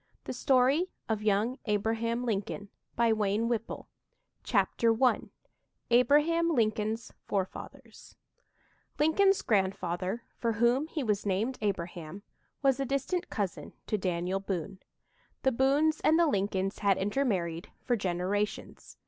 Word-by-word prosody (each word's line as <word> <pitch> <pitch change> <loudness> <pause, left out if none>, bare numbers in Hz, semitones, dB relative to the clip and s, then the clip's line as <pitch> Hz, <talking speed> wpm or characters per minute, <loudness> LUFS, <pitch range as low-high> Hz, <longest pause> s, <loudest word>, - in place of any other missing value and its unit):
THE - - -5
STORY 265 +7 +3 0.2
OF 220 -2 -1
YOUNG 215 +4 +1
ABRAHAM 225 +3 0
LINCOLN 205 -2 -3 1.7
CHAPTER 230 +2 +2
I 250 - +3 0.7
ABRAHAM 295 +8 +4
LINCOLN'S 220 -1 0 0.2
FOREFATHERS 190 -2 -5 0.8
Lincoln's 385 +6 +3
grandfather, 190 +1 0 0.2
for 230 -1 0
whom 240 +7 +2
he 315 -3 -3
was 210 -3 -1
named 215 +7 -1
Abraham, 180 -2 -4 0.4
was 270 -1 +3
a 275 - 0
distant 275 +7 -2
cousin 200 -4 -4
to 215 - -1
Daniel 180 +1 -1
Boone. 190 -2 -4 0.6
The 265 - +4
Boones 280 +5 +2
and 315 - +4
the 340 - +5
Lincolns 195 -6 -1
had 200 -2 +3
intermarried 190 -7 -1
for 245 - +1
generations. 195 +1 -3
220 Hz, 110 wpm, -30 LUFS, 195-265 Hz, 1.7 s, the